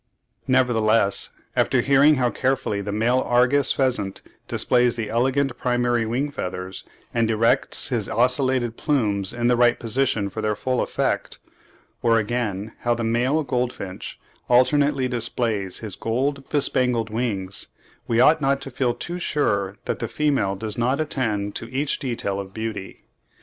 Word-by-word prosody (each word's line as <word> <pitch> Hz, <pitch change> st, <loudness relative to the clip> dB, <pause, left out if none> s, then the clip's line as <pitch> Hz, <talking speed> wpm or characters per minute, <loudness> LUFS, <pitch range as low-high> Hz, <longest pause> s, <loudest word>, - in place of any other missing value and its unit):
Nevertheless, 115 Hz, -5 st, +2 dB, 0.3 s
after -, -, +2 dB
hearing 140 Hz, +3 st, +5 dB
how 125 Hz, -3 st, +1 dB
carefully 130 Hz, -6 st, -1 dB
the 100 Hz, +1 st, -4 dB
male 115 Hz, +5 st, +2 dB
Argus 125 Hz, +3 st, +3 dB
pheasant 125 Hz, -8 st, -1 dB, 0.2 s
displays 125 Hz, -1 st, +2 dB
his 115 Hz, -2 st, -3 dB
elegant 130 Hz, +2 st, +1 dB
primary 120 Hz, -2 st, +1 dB
wing 135 Hz, +6 st, -1 dB
feathers, 90 Hz, -6 st, -5 dB, 0.3 s
and 115 Hz, -1 st, +1 dB
erects 115 Hz, +1 st, +1 dB
his -, -, -1 dB
ocellated 125 Hz, 0 st, +1 dB
plumes 105 Hz, -9 st, 0 dB
in 120 Hz, 0 st, -3 dB
the 125 Hz, 0 st, +4 dB
right 120 Hz, 0 st, +3 dB
position 115 Hz, -3 st, 0 dB
for 110 Hz, +3 st, -5 dB
their 105 Hz, -1 st, 0 dB
full 125 Hz, +4 st, -1 dB
effect; -, -, -1 dB, 0.6 s
or 115 Hz, -1 st, +3 dB
again, 110 Hz, -2 st, -2 dB
how 120 Hz, 0 st, +1 dB
the 115 Hz, -, -3 dB
male 125 Hz, +7 st, +1 dB
goldfinch 125 Hz, -7 st, -4 dB, 0.3 s
alternately 135 Hz, +2 st, +3 dB
displays 115 Hz, -5 st, -1 dB
his 100 Hz, -4 st, -4 dB
gold 135 Hz, +6 st, -2 dB
bespangled 125 Hz, -6 st, +1 dB
wings, 100 Hz, -5 st, -2 dB, 0.4 s
we 115 Hz, -2 st, +1 dB
ought 150 Hz, +5 st, +5 dB
not 135 Hz, 0 st, +2 dB
to 135 Hz, -, -7 dB
feel 125 Hz, -1 st, 0 dB
too 175 Hz, +8 st, -5 dB
sure 100 Hz, -, 0 dB
that -, -, -2 dB
the 115 Hz, -, -2 dB
female 135 Hz, -9 st, 0 dB
does 110 Hz, +2 st, -2 dB
not 130 Hz, +4 st, +1 dB
attend 110 Hz, -9 st, -1 dB
to 115 Hz, -, -6 dB
each 135 Hz, +2 st, -1 dB
detail 115 Hz, -7 st, -2 dB
of 95 Hz, -1 st, -8 dB
beauty. 110 Hz, -3 st, -6 dB
120 Hz, 150 wpm, -23 LUFS, 110-130 Hz, 0.6 s, hearing